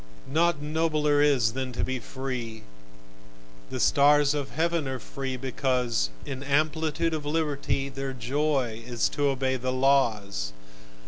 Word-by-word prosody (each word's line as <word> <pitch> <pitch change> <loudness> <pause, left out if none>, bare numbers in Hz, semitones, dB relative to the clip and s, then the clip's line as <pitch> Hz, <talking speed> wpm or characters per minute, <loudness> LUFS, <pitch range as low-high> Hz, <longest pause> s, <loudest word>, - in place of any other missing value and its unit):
Nought 160 0 +1
nobler 150 -1 +2
is, 130 -7 +3
than 130 0 -3
to - - -1
be 130 0 -2
free: 120 -4 -5 1.1
The - - -4
stars 145 0 +5
of 145 -2 -3
heaven 165 -1 0
are 130 0 -2
free 130 0 -5
because 125 - 0 0.2
In 135 -1 -5
amplitude 155 +3 +1
of 155 -2 -2
liberty 145 -3 -1
Their 135 0 -4
joy 130 -2 -1
is 120 -1 0
to 145 -1 0
obey 130 -1 0
the 130 +1 -2
laws. 110 - +1
135 Hz, 135 wpm, -27 LUFS, 130-150 Hz, 1.1 s, stars